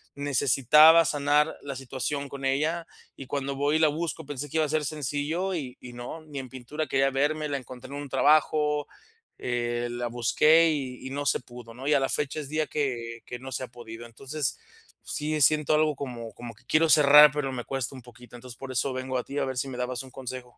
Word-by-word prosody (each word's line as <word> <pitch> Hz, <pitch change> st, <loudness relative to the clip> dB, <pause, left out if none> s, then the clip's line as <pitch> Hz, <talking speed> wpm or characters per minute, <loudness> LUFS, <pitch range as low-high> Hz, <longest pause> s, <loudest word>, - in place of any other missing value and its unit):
necesitaba 145 Hz, +4 st, +5 dB
sanar 145 Hz, +1 st, +2 dB
la 140 Hz, -2 st, -5 dB
situación 135 Hz, +2 st, -3 dB
con 140 Hz, -1 st, -8 dB
ella. 155 Hz, +5 st, 0 dB, 0.3 s
Y 135 Hz, -, -10 dB
cuando 140 Hz, -1 st, -3 dB
voy, 145 Hz, +3 st, +1 dB
y -, -, -1 dB
la 160 Hz, -, +5 dB
busco 160 Hz, 0 st, -4 dB
pensé 145 Hz, 0 st, -6 dB
que 160 Hz, -, -3 dB
iba 155 Hz, -, +3 dB
a -, -, -5 dB
ser 155 Hz, 0 st, 0 dB
sencillo 150 Hz, +6 st, -2 dB
y 130 Hz, -7 st, -5 dB
y 125 Hz, -1 st, -10 dB
no. 120 Hz, +7 st, -7 dB
Ni 145 Hz, -2 st, -7 dB
en 130 Hz, -1 st, -8 dB
pintura 130 Hz, +5 st, -5 dB
quería 135 Hz, 0 st, +2 dB
verme, 150 Hz, +3 st, 0 dB
la 140 Hz, -, -1 dB
encontré 125 Hz, -1 st, -10 dB
en 145 Hz, +1 st, -6 dB
un 145 Hz, -, -8 dB
trabajo, 150 Hz, +1 st, +2 dB, 0.5 s
eh, 120 Hz, 0 st, -2 dB
la 120 Hz, 0 st, -3 dB
busqué 155 Hz, +8 st, +4 dB
y 130 Hz, -5 st, -4 dB
y -, -, -7 dB
no 145 Hz, +1 st, -3 dB
se -, -, +2 dB
pudo, 120 Hz, -1 st, -12 dB
¿no? 130 Hz, +4 st, -8 dB
Y 150 Hz, -, +4 dB
a 140 Hz, -, +3 dB
la 135 Hz, -, 0 dB
fecha 150 Hz, +1 st, -1 dB
es 140 Hz, -, -9 dB
día 155 Hz, +1 st, -1 dB
que 115 Hz, -5 st, -3 dB
que 125 Hz, -, -7 dB
no 130 Hz, +1 st, -9 dB
se 130 Hz, -, -3 dB
ha -, -, -5 dB
podido. 115 Hz, -1 st, -10 dB
Entonces, 135 Hz, +4 st, -4 dB, 0.4 s
sí 155 Hz, +1 st, -2 dB
siento 150 Hz, +1 st, +4 dB
algo 155 Hz, -1 st, +2 dB
como, 120 Hz, -5 st, -7 dB
como 120 Hz, -1 st, -9 dB
que -, -, -25 dB
quiero 160 Hz, +1 st, +3 dB
cerrar, 150 Hz, -1 st, +8 dB
pero 145 Hz, -3 st, -2 dB
me 120 Hz, -2 st, -4 dB
cuesta 135 Hz, 0 st, -3 dB
un 130 Hz, -, -10 dB
poquito, 120 Hz, 0 st, -15 dB
entonces, 125 Hz, 0 st, -11 dB
por 135 Hz, -1 st, -7 dB
eso 130 Hz, +2 st, 0 dB
vengo 130 Hz, 0 st, -3 dB
a 125 Hz, -, -2 dB
ti 140 Hz, -, -7 dB
a -, -, 0 dB
ver 130 Hz, -1 st, -4 dB
si 135 Hz, -, -1 dB
me 125 Hz, -, -7 dB
dabas 125 Hz, 0 st, -3 dB
un 130 Hz, -, -14 dB
consejo. 125 Hz, -1 st, -8 dB
135 Hz, 230 wpm, -27 LUFS, 125-150 Hz, 0.5 s, cerrar